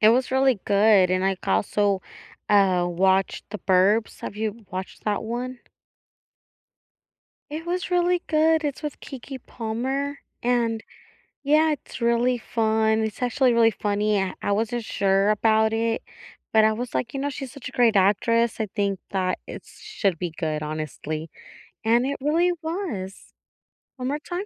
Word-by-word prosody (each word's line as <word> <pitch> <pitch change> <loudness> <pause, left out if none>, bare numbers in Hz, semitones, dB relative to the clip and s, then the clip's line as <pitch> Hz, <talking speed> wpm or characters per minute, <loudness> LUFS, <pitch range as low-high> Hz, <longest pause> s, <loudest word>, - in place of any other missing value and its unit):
it 215 - +7
was 250 +2 +2
really 265 -1 +3
good 200 -2 +4
and 185 0 +1
I 195 0 +1
also, 190 - +1 0.5
uh, 190 -4 +4
watched 190 +2 +1
The 210 - -5
Burbs. 195 +4 +2
Have - - -6
you 220 0 -4
watched 185 +1 -7
that 210 -2 0
one? 245 +3 -4 1.9
It 310 +3 -6
was 360 +1 -3
really 355 0 +2
good. 315 0 +3
It's 290 -2 -3
with 300 -2 -5
Keke 270 0 -8
Palmer 265 +5 -3 0.2
and 235 -2 +1 0.6
Yeah, 305 +2 +4
it's 290 -3 -6
really 235 +1 +2
fun, 220 -1 +1
it's 220 +1 -4
actually 250 0 +2
really 230 -1 +5
funny. 205 0 0
I 190 - -2
I - - -1
wasn't 225 +3 -1
sure 195 0 +2
about 220 +1 +3
it, 225 0 0 0.5
but 220 -1 +6
I 220 - +5
was, 240 +3 -4
like, 230 +1 -2
you 275 - -3
know, 285 +1 -1
she's 270 -2 -6
such 280 - -9
a - - -8
great 235 -3 +3
actress. 230 +5 +2
I 215 - -1
think 200 -2 0
that 185 -2 -1
it - - -9
should 225 - -3
be 175 - -2
good, 155 -2 -3
honestly, 155 +1 -5 0.5
and 235 +3 +3
it 280 - -2
really 330 +5 +2
was. 320 - -5 0.6
One 255 -1 -3
more 290 +3 -1
time? 355 +5 -5
225 Hz, 160 wpm, -24 LUFS, 200-265 Hz, 1.9 s, it